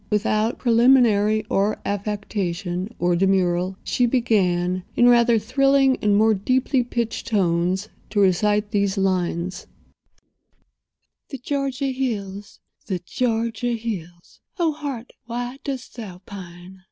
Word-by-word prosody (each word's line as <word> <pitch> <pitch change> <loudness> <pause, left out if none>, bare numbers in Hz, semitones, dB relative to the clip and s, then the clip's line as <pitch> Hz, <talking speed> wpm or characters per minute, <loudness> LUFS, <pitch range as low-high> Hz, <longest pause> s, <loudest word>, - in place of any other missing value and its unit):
Without 215 +1 +1
preliminary 230 -3 +4
or 205 +1 +1
affectation 200 -2 -3
or 175 0 +1
demurral 185 0 +1
she 245 - +1
began, 185 -7 +1
in 240 - +5
rather 235 -1 +5
thrilling 270 +4 +3
and 205 -1 +2
more 220 +1 +4
deeply 255 +5 +1
pitched 235 -1 -3
tones 185 -1 +1 0.2
to 210 - -1
recite 205 +2 +2
these 200 -2 0
lines: 185 -2 -1 1.6
"The 275 - -6
Georgia 275 0 -2
hills, 205 -6 -4 0.3
the 190 - -1
Georgia 230 +1 -1
hills!— 180 -7 -6 0.2
Oh, 335 -3 +2
heart, 280 -5 -6
why 245 +2 -4
dost 265 -3 -6
thou 195 -6 -8
pine? 185 -1 -11
210 Hz, 115 wpm, -22 LUFS, 190-245 Hz, 1.6 s, in